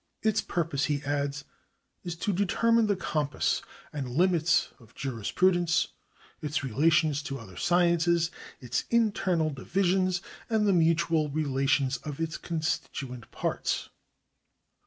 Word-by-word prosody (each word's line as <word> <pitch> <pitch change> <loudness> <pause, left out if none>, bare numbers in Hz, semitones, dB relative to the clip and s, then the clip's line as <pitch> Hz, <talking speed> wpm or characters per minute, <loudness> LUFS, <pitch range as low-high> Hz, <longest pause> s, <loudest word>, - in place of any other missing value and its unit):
" - - -51
Its 220 -1 +2
purpose," 160 -5 -1
he 145 -1 -1
adds, 145 0 -2 0.3
" - - -48
is 175 -2 -4
to 200 +4 -1
determine 225 +4 +3
the 205 - +2
compass 150 -7 -1 0.3
and 140 -4 -4
limits 170 +4 +3
of 115 -1 -19
jurispru 135 - +1
dence, 175 -1 +1 0.5
its 150 0 -2
relations 150 +3 +2
to 140 -2 -5
other 110 -7 -12
sciences, 170 - +2 0.3
its 125 -2 -2
internal 195 -8 +2
divisions, 185 +5 0 0.3
and 220 -2 +2
the 200 - +4
mutual 165 -2 +2
relations 135 -2 +1
of 145 +3 -7
its 165 -1 -2
constituent 140 -7 -3
parts." - - -2
160 Hz, 130 wpm, -28 LUFS, 140-175 Hz, 0.5 s, the